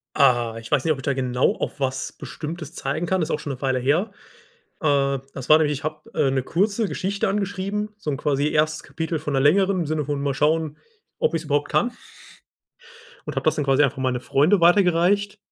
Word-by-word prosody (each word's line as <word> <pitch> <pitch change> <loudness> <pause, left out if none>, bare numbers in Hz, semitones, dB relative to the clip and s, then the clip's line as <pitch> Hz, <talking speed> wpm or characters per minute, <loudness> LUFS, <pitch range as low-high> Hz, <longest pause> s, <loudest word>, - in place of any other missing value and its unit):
Ah, 120 -4 +3
ich 115 - -11
weiß 140 -3 +2
nicht, 160 - +2
ob 145 - 0
ich - - -9
da 140 - +1
genau 125 -1 +1
auf - - -5
was 135 -1 -2
Bestimmtes 155 -1 -7
zeigen 150 +5 -2
kann. 185 +1 0
Das 160 - -1
ist - - +1
auch - - -8
schon 145 - -4
'ne 130 - -11
Weile 130 -2 +1
her. 155 - +1 0.7
Äh, 140 -3 +2
das 130 0 -8
war 155 - +9
nämlich 150 -2 +1
ich 145 +2 -6
habe, 155 0 -5
äh, 135 - +2
'ne 130 -2 0
kurze 200 - 0
Geschichte 195 +2 -2
angeschrieben, 200 +1 -2
so 155 -8 -4
'n 135 - -2
quasi 145 -1 0
erstes 155 0 +1
Kapitel 160 +2 -3
von 150 -1 -4
'ner 135 - +2
längeren 190 +6 +3
im - - -1
Sinne 155 -2 -1
von: 145 -1 -2
„Mal 140 -1 0
schauen, 155 +1 0 0.4
ob - - +1
ich's 165 -1 -2
überhaupt 145 0 0
kann.“ 245 - +2 1.4
Und - - -4
habe - - -1
das - - +2
dann 145 - -1
quasi 135 +2 +4
einfach 135 - 0
an 130 - -3
meine 125 -1 0
Freunde 165 +10 +3
weitergereicht. 190 +3 +3
150 Hz, 225 wpm, -23 LUFS, 135-175 Hz, 1.4 s, war